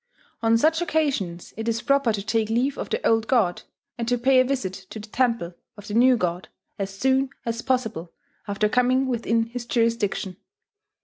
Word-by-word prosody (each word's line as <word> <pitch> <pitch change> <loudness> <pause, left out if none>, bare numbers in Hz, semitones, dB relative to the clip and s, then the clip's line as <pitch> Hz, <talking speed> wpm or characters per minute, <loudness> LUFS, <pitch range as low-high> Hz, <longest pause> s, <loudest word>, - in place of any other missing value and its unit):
On 225 0 +4
such 320 +7 +2
occasions 275 - -1
it 225 +1 -4
is 230 0 -1
proper 275 -4 +3
to 205 -2 -3
take 220 0 0
leave 250 +5 +1
of - - -5
the 460 - 0
old 225 0 +2
god, 210 -9 +2 0.4
and 230 - -2
to 245 0 +2
pay 260 +2 +4
a - - +6
visit 255 -8 -2 0.2
to - - -8
the 210 - -9
temple 230 -7 0 0.2
of 205 0 -11
the 205 - -5
new 250 +2 +5
god 180 -2 -2 0.3
as 195 -1 -2
soon 265 +6 +1 0.2
as 230 0 -2
possible 225 -11 -2 0.4
after 205 +1 +1
coming 250 +3 +2
within 230 -2 0
his 235 +1 -7
jurisdiction. 230 -6 0
230 Hz, 185 wpm, -24 LUFS, 210-255 Hz, 0.4 s, a